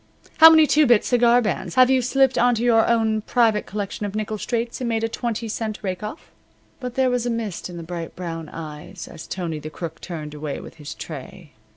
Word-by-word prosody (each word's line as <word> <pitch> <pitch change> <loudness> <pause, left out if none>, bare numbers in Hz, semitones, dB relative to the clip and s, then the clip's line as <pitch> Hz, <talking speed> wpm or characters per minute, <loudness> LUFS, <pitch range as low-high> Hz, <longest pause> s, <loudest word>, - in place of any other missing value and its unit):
H'm? - - -24
How 320 +1 +12
many 320 -1 +7
two 300 0 +4
bit 240 -3 +4
cigar 240 0 +4
bands 185 -4 -3
have 255 0 +6
you 260 -1 +4
slipped 265 +1 +2
onto 240 -1 +2
your 230 -2 +4
own 220 -2 +2
private 220 -2 +2
collection 205 0 -4
of 205 0 -4
nickel 215 0 -3
straights 235 +2 -3
and 245 - -1
made 225 -1 -1
a - - +2
twenty 230 0 -3
cent 220 -1 -3
rake 185 -2 -3
off?" 210 +9 -8 0.5
But 250 -2 -6
there 260 -1 +2
was 245 -1 0
a - - 0
mist 225 -7 -4
in 175 - -8
the 170 - -6
bright 165 0 -6
brown 165 -3 -6
eyes 160 +3 -8
as 160 - -10
Tony 170 -4 -4
the 155 - -7
Crook 160 0 -7
turned 155 -4 -6
away 150 -1 -5
with - - -12
his 150 -1 -8
tray. 150 0 -9
215 Hz, 225 wpm, -23 LUFS, 170-240 Hz, 0.5 s, How